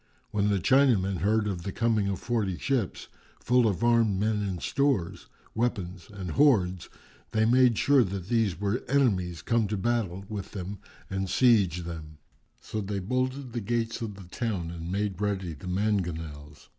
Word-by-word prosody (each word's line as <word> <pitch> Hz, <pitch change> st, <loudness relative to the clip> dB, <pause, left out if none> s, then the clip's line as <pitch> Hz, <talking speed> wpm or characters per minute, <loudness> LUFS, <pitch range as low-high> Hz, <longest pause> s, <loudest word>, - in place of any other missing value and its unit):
When 105 Hz, 0 st, +1 dB
the 100 Hz, -, +2 dB
Chinamen 100 Hz, -3 st, +3 dB
heard 105 Hz, +4 st, +1 dB
of 95 Hz, -4 st, -2 dB
the 95 Hz, -, -4 dB
coming 110 Hz, -2 st, +1 dB
of 100 Hz, -1 st, -1 dB
forty 110 Hz, -7 st, -1 dB
ships, 125 Hz, -, -1 dB, 0.3 s
full 125 Hz, -1 st, +3 dB
of 105 Hz, +1 st, -1 dB
armed 115 Hz, -5 st, +3 dB
men 105 Hz, 0 st, +1 dB
and 95 Hz, -3 st, -3 dB
stores, 135 Hz, -11 st, 0 dB, 0.3 s
weapons 95 Hz, -7 st, -2 dB
and 95 Hz, -4 st, -6 dB
hoards, 95 Hz, -, +3 dB, 0.4 s
they 110 Hz, 0 st, +3 dB
made 125 Hz, -1 st, +4 dB
sure 140 Hz, -3 st, +5 dB
that 95 Hz, -3 st, -5 dB
these 110 Hz, -7 st, +1 dB
were 105 Hz, +4 st, -1 dB
enemies 95 Hz, -, +1 dB
come 115 Hz, -2 st, +1 dB
to 105 Hz, +1 st, -2 dB
battle 100 Hz, -4 st, -1 dB
with 100 Hz, -2 st, -6 dB
them 100 Hz, 0 st, -5 dB, 0.3 s
and 95 Hz, 0 st, -2 dB
seige 95 Hz, -6 st, +3 dB
them; 80 Hz, -2 st, -8 dB, 0.4 s
so 110 Hz, -, -4 dB
they 100 Hz, 0 st, -3 dB
bolted 130 Hz, +5 st, -2 dB
the 120 Hz, -, -2 dB
gates 115 Hz, +2 st, -2 dB
of 110 Hz, -3 st, -4 dB
the 100 Hz, -, -11 dB
town 90 Hz, -4 st, -3 dB
and 85 Hz, 0 st, -6 dB
made 100 Hz, -1 st, -2 dB
ready 95 Hz, -4 st, -1 dB
the 75 Hz, +5 st, -10 dB
mangonels. 85 Hz, -7 st, -3 dB
100 Hz, 170 wpm, -28 LUFS, 90-115 Hz, 0.4 s, sure